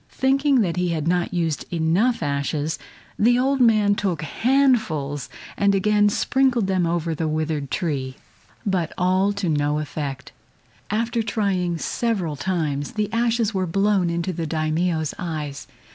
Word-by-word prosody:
Thinking 270 0 +2
that 175 -4 -1
he 180 0 +1
had 160 -2 -2
not 175 0 +1
used 165 -4 -2
enough 175 +9 +1
ashes, 145 +2 -1 0.4
the 240 +3 +4
old 270 +2 +1
man 215 -4 +4
took 180 -6 -2
handfuls 215 - +1 0.3
and 200 0 +2
again 205 +1 +3
sprinkled 255 +1 +2
them 185 -3 +1
over 165 -1 -1
the 160 +1 -2
withered 155 -2 -2
tree. 135 -6 -2 0.5
But 185 -5 0
all 185 +2 +2
to 200 -2 -3
no 150 -1 +1
effect. 145 -2 -5 0.6
After 230 +2 0
trying 195 -6 -1
several 190 -5 -1
times, 145 -3 -2
the 215 -1 -2
ashes 230 -1 +1
were 185 -2 -1
blown 195 0 +2
into 170 +2 -2
the 165 -1 -3
Daimio's 160 0 0
eyes. 150 -5 -5
180 Hz, 145 wpm, -23 LUFS, 155-210 Hz, 0.6 s, the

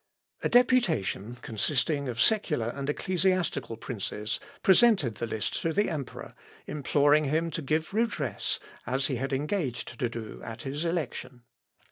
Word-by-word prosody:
A - - 0
deputation, 180 - +3
consisting 140 +4 0
of 115 -2 -4
secular 150 - +3
and 140 +3 -4
ecclesiastical 180 -8 0
princes, 105 -2 -3 0.2
presented 190 - +5
the 115 - -2
list 110 -2 -2
to 165 - 0
the 205 +1 +2
emperor, 145 -5 -6 0.3
imploring 145 +1 +3
him 160 +4 0
to 165 - -3
give 155 +5 -1
redress, 185 - 0 0.3
as 130 +2 +1
he 130 -3 0
had 135 +3 -2
engaged 135 - -2
to 120 - +1
do 115 -2 -7
at 115 0 -7
his 145 +5 -3
election. 130 -7 -3
140 Hz, 140 wpm, -28 LUFS, 120-165 Hz, 0.3 s, presented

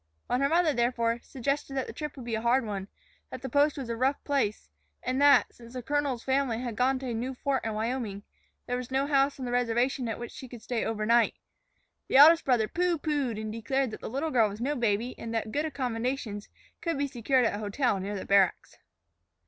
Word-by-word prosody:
When 250 - 0
her 275 - +3
mother, 330 -1 +3
therefore, 235 -1 +1
suggested 275 +2 -3
that 265 - -1
the - - -8
trip 300 -2 -6
would 260 -4 -9
be 235 - -4
a 220 - -1
hard 240 +2 +2
one, 195 -2 -4 0.4
that 255 - -8
the 265 - -3
post 285 +4 +3
was 265 -3 -4
a 230 - -2
rough 265 +4 0
place, 265 - -1 0.4
and 255 +2 -1
that, 285 0 +5
since 235 0 -14
the 250 -1 -5
colonel's 280 -2 -1
family 265 -3 +1
had 240 -3 -4
gone 260 +3 +2
to 260 -1 -4
a - - -2
new 250 +4 -3
fort 270 +1 -1
in 220 -1 -3
Wyoming, 220 -3 -3 0.4
there 245 - -2
was 250 -1 -6
no 265 +1 +1
house 275 -1 +2
on 260 - -4
the 245 - -3
reservation 245 +1 +1
at 225 - -3
which 240 - -7
she 265 - -9
could 240 -2 -11
stay 240 -3 -2
overnight, 225 +2 +2 0.7
the - - +3
eldest 320 +4 +8
brother 240 -5 +3
pooh 350 +3 0
poohed 285 -7 -1
and 215 0 -4
declared 240 +3 -1
that - - -8
the - - -5
little 280 +7 -2
girl 225 -5 +4
was 205 +1 -8
no 280 +5 -1
baby 235 0 0
and 230 0 -5
that 225 - +1
very 215 - -9
good 295 +5 0
accommodations 245 -6 -3 0.3
could 335 -4 -1
be 285 - +1
secured 255 -1 +1
at - - +1
a 205 - -4
hotel 210 +1 0
near 200 +2 -4
the 195 - -5
barracks. 195 -2 +2
250 Hz, 230 wpm, -28 LUFS, 225-275 Hz, 0.7 s, eldest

